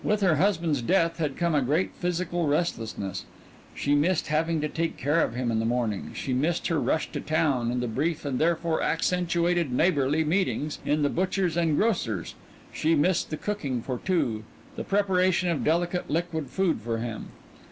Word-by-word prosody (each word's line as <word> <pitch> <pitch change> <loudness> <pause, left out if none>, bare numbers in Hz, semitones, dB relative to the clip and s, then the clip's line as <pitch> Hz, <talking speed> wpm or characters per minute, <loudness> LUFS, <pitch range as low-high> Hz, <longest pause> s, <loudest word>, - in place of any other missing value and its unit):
With 210 0 +1
her 175 -6 +3
husband's 165 -6 +1
death 165 +4 +1
had 150 -4 -2
come 170 -1 +1
a 145 - +3
great 150 +8 +1
physical 175 -1 -1
restlessness. 110 - -2 0.5
She 145 - 0
missed 155 +4 +2
having 160 +1 +1
to 150 - 0
care 160 -1 0
for 115 - -10
him 125 -1 -1
in 110 - +1
the - - 0
morning, 115 -3 -1
she 130 - -3
missed 155 +7 0
her 165 -2 +1
rush 160 - 0
to - - -4
town, 140 -7 +1
and 125 0 -1
the - - -1
brief 150 +7 -1
and 135 -3 -1
therefore 165 0 +1
accentuated 175 -2 +1
neighborly 150 +1 +2
meetings 155 -2 0
in 150 0 +1
the 145 - +3
butcher's 185 0 0
and 165 -3 +2
grocer's; 125 - 0 0.4
she 160 +1 +2
missed 165 +4 +2
the 155 - -3
cooking 140 - -3
for 125 -3 -3
two, 120 - 0 0.3
the - - -4
preparation 185 -2 +2
of 165 -4 -1
delicate 175 +3 0
liquid 160 -3 -2
food 180 - 0
for 115 +1 -2
him. 115 -1 -5
160 Hz, 180 wpm, -27 LUFS, 135-175 Hz, 0.5 s, her